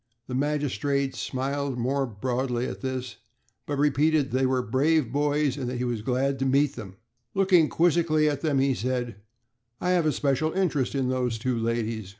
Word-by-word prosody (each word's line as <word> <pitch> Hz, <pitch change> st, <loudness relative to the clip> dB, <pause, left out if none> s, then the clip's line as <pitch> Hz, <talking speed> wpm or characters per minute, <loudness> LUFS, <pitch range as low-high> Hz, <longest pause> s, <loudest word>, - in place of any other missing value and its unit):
The 125 Hz, -, -7 dB
magistrate 140 Hz, -1 st, 0 dB
smiled 135 Hz, 0 st, -2 dB
more 135 Hz, +3 st, 0 dB
broadly 125 Hz, +2 st, -2 dB
at -, -, -6 dB
this, 130 Hz, -2 st, -4 dB, 0.5 s
but 145 Hz, -, -2 dB
repeated 145 Hz, 0 st, +2 dB
that 130 Hz, -, +1 dB
they 130 Hz, -, +3 dB
were 130 Hz, -1 st, +1 dB
brave 135 Hz, +2 st, +1 dB
boys, 145 Hz, -1 st, +1 dB
and 130 Hz, -3 st, -3 dB
that 125 Hz, -, -3 dB
he 125 Hz, -, -2 dB
was 120 Hz, -3 st, -2 dB
glad 135 Hz, +4 st, 0 dB
to 135 Hz, -, 0 dB
meet 140 Hz, +2 st, +2 dB
them. 100 Hz, -6 st, -8 dB, 0.4 s
Looking 185 Hz, -5 st, +4 dB
quizzically 165 Hz, -2 st, +2 dB
at 145 Hz, -2 st, -1 dB
them, 150 Hz, -4 st, +1 dB
he 135 Hz, 0 st, +3 dB
said: 120 Hz, -3 st, -2 dB, 0.6 s
"I 180 Hz, -, 0 dB
have 175 Hz, -3 st, +2 dB
a -, -, +3 dB
special 145 Hz, +2 st, 0 dB
interest 155 Hz, -9 st, 0 dB
in 130 Hz, -2 st, 0 dB
those 125 Hz, -3 st, -1 dB
two 125 Hz, +2 st, -1 dB
ladies. 115 Hz, -1 st, -1 dB
135 Hz, 180 wpm, -26 LUFS, 125-150 Hz, 0.6 s, Looking